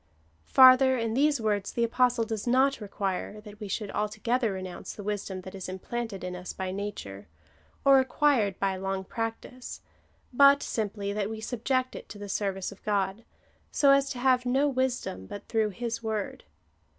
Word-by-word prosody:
Farther, 260 0 +7
in 230 -2 -1
these 285 +2 +3
words 205 -3 -1
the 235 - +1
Apostle 245 0 +2
does 220 0 -4
not 260 +1 +3
require, 200 0 -3
that 210 -1 -12
we 210 - -6
should 205 +1 -3
altogether 215 +3 0
renounce 185 -1 -6
the 205 - -9
wisdom 200 -2 -3
that 185 0 -10
is 190 -2 -6
implanted 200 +1 -5
in 180 0 -4
us 180 0 -7
by 190 -1 -4
nature, 185 - -6 0.6
or 275 -1 +7
acquired 260 - +2
by 195 -1 0
long 195 0 -3
practice; 225 +4 -5 0.5
but 280 +2 +6
simply, 205 -2 -3
that 205 -1 -1
we 220 0 -5
subject 255 +3 -1
it - - -9
to 205 - -9
the 205 0 -8
service 195 -1 -2
of 200 - -14
God, 200 +1 -1 0.5
so 280 -1 +4
as 275 0 +4
to 260 - -5
have 255 0 +3
no 265 +3 +2
wisdom 255 - -2
but 205 - -8
through 220 -2 +1
his 230 +3 -4
word. 220 -3 -4
220 Hz, 175 wpm, -28 LUFS, 195-250 Hz, 0.6 s, Farther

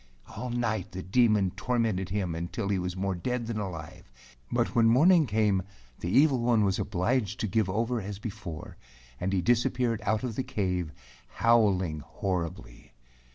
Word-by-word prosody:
All 125 - -4
night 110 -5 -2
the 95 0 -5
Demon 105 -2 +3
tor¬ 95 +7 -2
mented 95 -5 0
him 95 -3 -1
until 85 +5 -3
he 100 -2 +1
was 90 0 -3
more 95 0 -1
dead 120 +7 -2
than 115 -1 -3
alive, 80 -10 -7 0.4
but - - 0
when 115 -1 +4
morning 155 +7 +5
came, 105 -3 +2 0.4
the 85 - -3
evil 135 +5 +4
one 120 -2 +3
was 95 -1 0
obliged 110 +3 0
to 110 - 0
give 105 -1 +1
over 115 +4 0
as 100 0 -6
before, 100 -7 -7 0.4
and 95 +2 -1
he 95 -2 +1
disappeared 120 +2 +1
out 110 +2 0
of 120 -4 -3
the 130 - -1
cave, 90 -8 -2 0.4
howling 100 -9 +3
horribly. 85 +1 -5
105 Hz, 165 wpm, -28 LUFS, 95-115 Hz, 0.4 s, morning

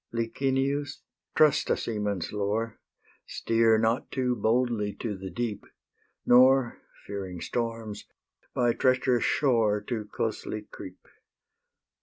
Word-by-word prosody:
Licinius, 135 +4 -1 0.3
trust 155 -2 +4
a - - +2
seaman's 105 -5 -3
lore: 105 +2 -2 0.5
Steer 115 -1 +2
not 115 +3 0
too 125 -1 0
boldly 110 -2 0
to 110 -4 -4
the 95 0 -7
deep, 110 +3 -3 0.6
Nor, 130 0 +5 0.2
fearing 95 -3 -6
storms, 115 0 -4 0.5
by 120 -1 +2
treacherous 130 -1 +2
shore 115 -7 +2
Too 110 0 -4
closely 110 -1 -3
creep. 90 -1 -11
115 Hz, 105 wpm, -27 LUFS, 105-125 Hz, 0.6 s, Nor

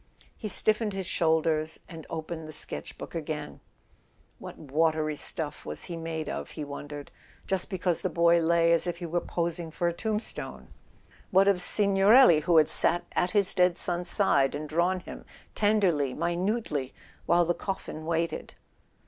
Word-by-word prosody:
He 215 - -6
stiffened 215 +1 +2
his 190 -1 -4
shoulders, 160 -2 0
and 165 -4 -10
opened 160 0 -5
the - - -8
sketch¬ 155 - -4
book - - -9
again. 155 -2 -5 0.8
What - - -9
watery 155 +1 0
stuff 150 +1 -4
was 75 - -6
he 175 - -6
made 165 -1 -4
of, - - -5
he 155 - -3
wondered? 145 0 -8 0.3
Just 190 -2 -1
because 180 -3 -1
the 185 - -1
boy 170 0 +4
lay 170 0 +3
as 170 +1 +1
if 175 - -2
he 175 - -6
were 170 +1 -1
posing 170 -1 -3
for 170 +2 -2
a 170 - 0
tombstone!... 215 +4 -4 0.6
What 195 +1 +4
of 195 -3 +3
Signorelli, 200 - +5
who 170 +2 +2
had 155 - +6
sat 175 +1 +3
at 180 - +1
his 200 -2 +4
dead 180 -1 +3
son's 175 0 0
side 140 -11 +2
and 150 +1 -5
drawn 175 +4 0
him, - - -10 0.3
tenderly, 185 -11 +2
mi¬ 170 +2 -1
nutely, 180 - -2 0.3
while 175 0 +4
the 175 - +1
coffin 180 -4 -5
waited? 165 0 -2
170 Hz, 165 wpm, -28 LUFS, 155-185 Hz, 0.8 s, had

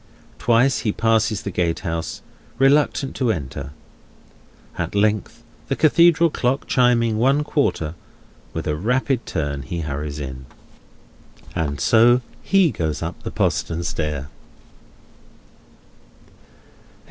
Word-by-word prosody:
Twice 120 +3 +3
he 105 - 0
passes 110 -2 +1
the 100 - -4
gatehouse, 85 -1 -2 0.3
reluctant 135 0 +2
to 125 -4 +1
enter. 70 -5 -5 1.1
At 85 +3 -4
length, 105 +2 0 0.2
the 135 - 0
Cathedral 170 +2 +4
clock 130 +1 -1
chiming 115 -4 +2
one 135 +5 +3
quarter, 110 - -1 0.6
with 80 - -5
a 75 - 0
rapid 125 - 0
turn 70 -4 -2
he 85 +4 -5
hurries 75 0 -4
in. 65 -2 -7 1.1
And 70 -3 -2
so 120 - +5 0.2
he 195 -5 +3
goes 80 -1 -3
up 85 +2 -5
the - - -5
postern 85 +1 -1
stair. 75 -4 -3
105 Hz, 110 wpm, -21 LUFS, 80-125 Hz, 1.1 s, so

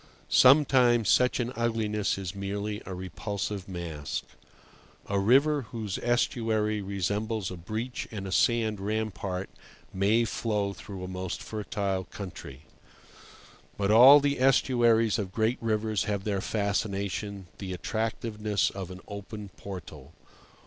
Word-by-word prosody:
Sometimes 125 -4 +5
such 125 +1 +4
an 120 +1 -2
ugliness 110 -4 0
is 95 -2 -5
merely 100 +1 -4
a 95 - -5
repulsive 100 +2 -4
mask. 85 -6 -4 0.8
A 100 0 0
river 135 +5 +3
whose 110 -5 -4
estuary 110 -3 0
resembles 100 +2 -2
a - - -5
breach 110 +8 -5
in 100 -3 -6
a 95 - -5
sand 110 -1 +2
rampart 100 -2 -3 0.5
may 105 +5 +3
flow 105 -3 -1
through 100 -2 -8
a - - -4
most 95 -1 -5
fertile 100 -3 -3
country. 85 -10 -9 1.2
But 100 0 +1
all 130 +6 +10
the 140 -1 0
estuaries 120 -4 +3
of 95 -3 -3
great 110 +4 0
rivers 110 -2 0
have 100 -3 -2
their 100 -2 -1
fascination, 100 -1 -2
the 95 -2 -5
attractiveness 110 +1 -1
of 95 -2 -6
an 95 0 -9
open 100 0 -7
portal. 95 -2 -10
105 Hz, 125 wpm, -28 LUFS, 95-115 Hz, 1.2 s, all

